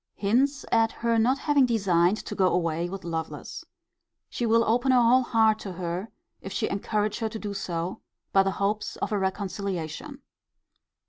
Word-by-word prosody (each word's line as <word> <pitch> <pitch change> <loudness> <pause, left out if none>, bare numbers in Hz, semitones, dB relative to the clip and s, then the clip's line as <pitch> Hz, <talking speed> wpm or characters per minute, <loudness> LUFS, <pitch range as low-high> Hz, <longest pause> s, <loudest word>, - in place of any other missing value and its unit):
Hints 265 +8 +1
at 225 -1 +3
her 230 -1 0
not 250 +5 +3
having 285 -2 +3
designed 190 -4 +2
to - - -5
go 190 -2 +3
away 170 -1 0
with 195 +1 -7
Lovelace. 165 -1 -5 0.7
She 240 - -1
will 230 +1 +4
open 245 +4 +2
her 255 - +5
whole 245 +2 +5
heart 220 -3 +3
to 195 -3 -6
her, 180 +4 -4 0.3
if 195 - -7
she - - -1
encourage 210 +1 -1
her 225 -1 -1
to 220 - -6
do 205 -2 -5
so, 175 -2 -4 0.3
by 195 - +6
the 195 - +1
hopes 205 +2 -1
of - - -3
a 210 - +1
reconciliation. 190 -4 -4
205 Hz, 175 wpm, -26 LUFS, 185-230 Hz, 0.7 s, by